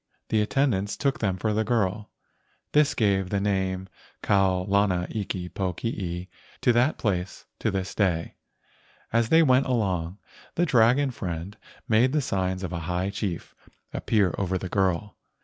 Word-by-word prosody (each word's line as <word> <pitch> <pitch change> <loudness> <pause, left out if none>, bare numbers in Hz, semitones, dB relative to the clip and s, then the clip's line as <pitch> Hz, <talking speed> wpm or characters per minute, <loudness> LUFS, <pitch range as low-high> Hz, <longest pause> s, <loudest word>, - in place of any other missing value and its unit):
The 110 - +2
attendants 105 -4 0
took 140 -1 0
them 95 -4 0
for 105 +3 0
the 110 +1 +1
girl. 105 -2 0 0.6
This 150 -1 +3
gave 95 -4 +1
the 100 - 0
name 95 -2 -1 0.4
Kau 95 -2 +3
lana 100 -3 +2
iki 95 -4 -3
pokii 90 -1 -3 0.3
to 120 - +4
that 120 +6 +2
place 95 -4 -2
to - - 0
this 95 -1 -3
day. 90 -5 0 0.8
As 115 -1 +2
they 165 +1 +6
went 130 -2 +4
along, 95 -8 -1 0.4
the 175 - +2
dragon 130 0 +4
friend 90 -3 -5 0.3
made 120 +4 +3
the 150 - +2
signs 95 -5 -1
of 90 -1 -4
a 85 - -2
high 90 +2 -1
chief 100 -4 -4 0.4
appear 100 -6 +1
over 95 -1 0
the 90 0 -5
girl. 95 +1 0
100 Hz, 150 wpm, -26 LUFS, 95-115 Hz, 0.8 s, they